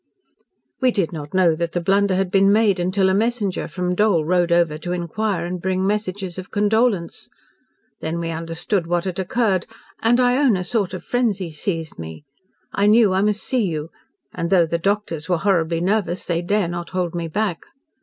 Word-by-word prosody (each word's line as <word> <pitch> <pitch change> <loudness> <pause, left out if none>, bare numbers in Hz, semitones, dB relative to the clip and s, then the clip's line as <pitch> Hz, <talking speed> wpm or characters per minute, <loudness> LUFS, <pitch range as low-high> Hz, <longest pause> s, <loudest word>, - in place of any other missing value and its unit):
"We 255 - +4
did 195 -8 -1
not 150 -2 -7
know 180 -3 +4
that 170 +1 -3
the 175 - 0
blunder 195 +2 +2
had 190 -1 0
been 195 0 +4
made 210 -3 +3
until 185 +2 +1
a 190 - +2
messenger 215 -2 0
from 180 +2 -2
Dole 180 -5 +2
rode 175 0 +2
over 170 -3 +2
to 175 +2 -4
inquire 180 +1 -2
and 180 0 -4
bring 185 +1 0
messages 195 -3 -2
of 185 - -9
condolence. 210 -3 0 0.7
Then 160 +2 -3
we 165 -1 -3
understood 165 +3 -2
what 175 +1 0
had 185 -1 -3
occurred 190 -1 0 0.3
and 240 +2 +3
I 250 0 +3
own 265 -8 +3
a 180 - -3
sort 190 -1 -1
of 185 - -8
frenzy 205 -8 -1
seized 160 - -4
me. 80 - -8 0.5
I 200 +1 +2
knew 215 -2 +5
I 190 - +2
must 210 +1 0
see 255 -2 0
you, 160 -3 -3 0.4
and, 170 - -3
though 180 -3 +4
the 170 +1 -2
doctors 185 -4 -2
were 175 - +2
horribly 170 -3 +1
nervous, 190 -1 0
they 170 -1 -1
dare 200 +1 0
not 175 0 -5
hold 180 -2 -2
me 170 -1 -3
back. 190 0 -2
185 Hz, 195 wpm, -21 LUFS, 170-205 Hz, 0.7 s, knew